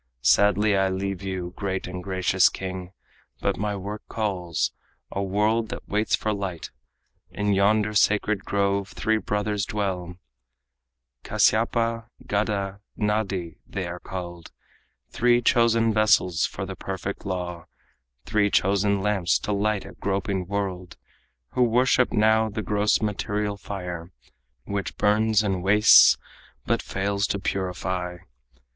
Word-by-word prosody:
Sadly 105 0 +4
I 95 0 +2
leave 95 0 -3
you, 95 -2 -4
great 95 -2 -3
and 90 0 -6
gracious 95 -1 +3
king, 95 -1 -6 0.5
But - - 0
my 105 0 -2
work 100 +2 -6
calls 95 -7 -1 0.4
a 100 - -2
world 105 +3 +1
that - - -7
waits 105 +2 +1
for 110 - -2
light. 95 -5 -5 0.6
In 105 0 -1
yonder 105 +2 +2
sacred 105 -1 +2
grove 100 -1 0
three 110 0 0
brothers 105 -1 -1
dwell 95 -5 -3 1.1
Kasyapa, 115 0 +1 0.2
Gada, 100 -1 -1 0.2
Nadi, 100 -6 -1
they 95 -2 -4
are 85 0 -6
called; 85 -3 -7 0.6
Three 120 +1 +3
chosen 115 -2 +3
vessels 105 -6 +3
for - - -6
the - - -6
perfect - - -5
law, 90 -3 -4 0.6
Three 105 -1 +2
chosen 100 0 +2
lamps 100 -4 +2
to 105 - -4
light 105 0 0
a - - -9
groping 95 -1 -2
world, 95 -3 -4 0.5
Who 125 - -1
worship 125 +1 +3
now 110 +1 +3
the 110 +1 -4
gross 105 +1 +1
material 105 0 -1
fire 90 -4 -6 0.5
Which 100 -1 -4
burns 110 +1 +3
and 95 -3 -1
wastes 105 +4 +7 0.5
but - - +1
fails 100 +1 -1
to - - -1
purify. 90 -2 -3
100 Hz, 125 wpm, -25 LUFS, 95-105 Hz, 1.1 s, wastes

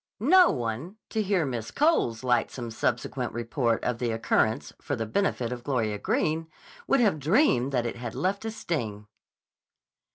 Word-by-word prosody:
No 355 - +6
one, 125 - -3 0.2
to 220 - 0
hear 195 -5 +1
Miss 120 -4 -4
Cole's 205 - +1
lightsome 120 -1 0
subsequent 110 - -2
report 120 0 -1
of 120 -1 -1
the 120 - 0
occurrence 110 -1 0
for 145 - -2
the 115 -2 -3
benefit 120 - 0
of 120 -1 -5
Gloria 110 -7 -1
Greene, 160 +7 0 0.4
would 275 - +3
have 200 -9 +3
dreamed 150 - +3
that 125 -3 0
it 120 - -3
had 120 -1 -6
left 195 +3 -1
a 225 - -2
sting. 120 - -4
125 Hz, 160 wpm, -27 LUFS, 115-190 Hz, 0.4 s, No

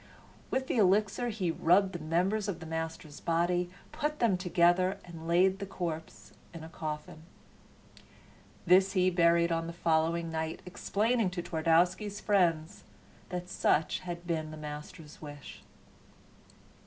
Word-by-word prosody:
With 265 0 -1
the 255 - -2
elixir 210 +4 +2
he 195 -6 -1
rubbed 190 +4 +3
the 175 - -4
members 180 +7 0
of 200 - -3
the 165 - -9
master's 160 -2 -5
body, 175 +1 0 0.2
put 300 0 -2
them 230 -8 +3
together, 180 +1 +2
and 165 -2 -9
laid 185 +3 +3
the 200 - -5
corpse 165 -4 -6 0.2
in 165 - -8
a 160 - -9
coffin. 155 -1 -6 1.4
This 190 +2 +5
he 185 -1 +3
buried 170 -1 +3
on 165 0 -1
the 170 - -6
following 165 0 +1
night, 160 0 -3
explaining 210 +4 0
to 180 -1 -5
Twardowski's 180 +5 +1
friends 170 -6 +1 0.5
that 180 0 -4
such 160 -3 +1
had 175 -1 -7
been 160 -2 -2
the 155 - -8
master's 150 +1 -9
wish. 145 -2 -10
175 Hz, 140 wpm, -30 LUFS, 160-190 Hz, 1.4 s, This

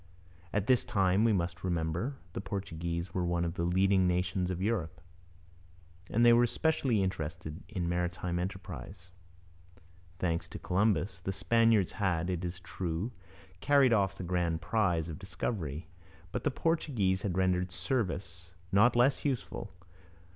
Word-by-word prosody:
At 100 -1 0
this 125 +1 +4
time, 100 -3 +2
we 115 - +4
must 85 -3 -1
remember, 85 - -1 0.2
the - - -3
Portuguese 85 -3 -4
were 90 - 0
one 85 0 0
of 85 - -2
the 85 - -4
leading 95 +1 +3
nations 90 +1 0
of 90 -1 -2
Europe, 95 -7 -1 1.1
and 120 +2 +3
they 120 - +8
were 120 +1 +5
specially 130 -7 +1
interested 85 -2 -4
in 90 -6 -2
maritime 90 0 -1
enterprise. 90 0 -6 1.1
Thanks 85 -2 -1
to - - -8
Columbus, 95 -2 +1
the 90 +2 -3
Spaniards 115 0 +3
had, 90 -4 0
it 90 -1 -3
is 90 +1 -4
true, 90 +4 -3 0.5
carried 135 +2 +5
off 100 -4 +2
the - - -6
grand 85 -2 0
prize 85 -2 +1
of 80 +1 -6
discovery. 90 - -4 0.4
But 125 +2 -4
the - - +4
Portuguese 130 - 0
had 95 -3 -2
rendered 90 -1 +2
service 90 -4 -3 0.2
not 110 +5 +5
less 125 +3 +3
useful. 135 -5 -3
95 Hz, 145 wpm, -31 LUFS, 85-110 Hz, 1.1 s, they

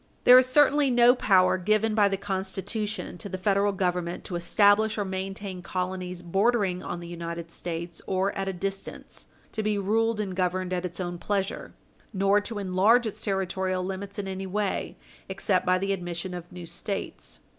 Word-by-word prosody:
There 250 +1 +9
is 255 - +2
certainly 290 +1 +4
no 245 0 +6
power 190 -7 +3
given 215 +3 +2
by 210 -2 +4
the 195 -1 -1
Constitution 195 +1 -4
to 200 - -6
the 185 - -4
Federal 200 +2 +2
Government 180 -2 -2
to 180 - -5
establish 205 +5 +3
or 205 - -1
maintain 190 0 -5
colonies 180 0 -4
bordering 195 0 +1
on 175 - -5
the 170 - -8
United 170 -1 -6
States 170 0 -6
or 190 +1 0
at 195 0 -2
a - - 0
distance 195 +2 -6 0.2
to 220 - -3
be 210 -1 0
ruled 220 +3 +1
and 195 -3 -3
governed 185 0 -1
at 180 0 -1
its 180 +1 -5
own 175 -1 -4
pleasure, 195 0 -3 0.4
nor 195 +1 +3
to 215 +1 -6
enlarge 205 +5 +3
its 215 - -3
territorial 190 -2 -1
limits 195 +2 -5
in 200 -1 -3
any 190 0 -4
way 205 +1 -2 0.3
except - - 0
by 185 0 +4
the 195 +1 0
admission 175 0 -5
of 175 -1 -8
new 180 -1 -8
States. 195 +4 -5
195 Hz, 175 wpm, -27 LUFS, 180-205 Hz, 0.4 s, There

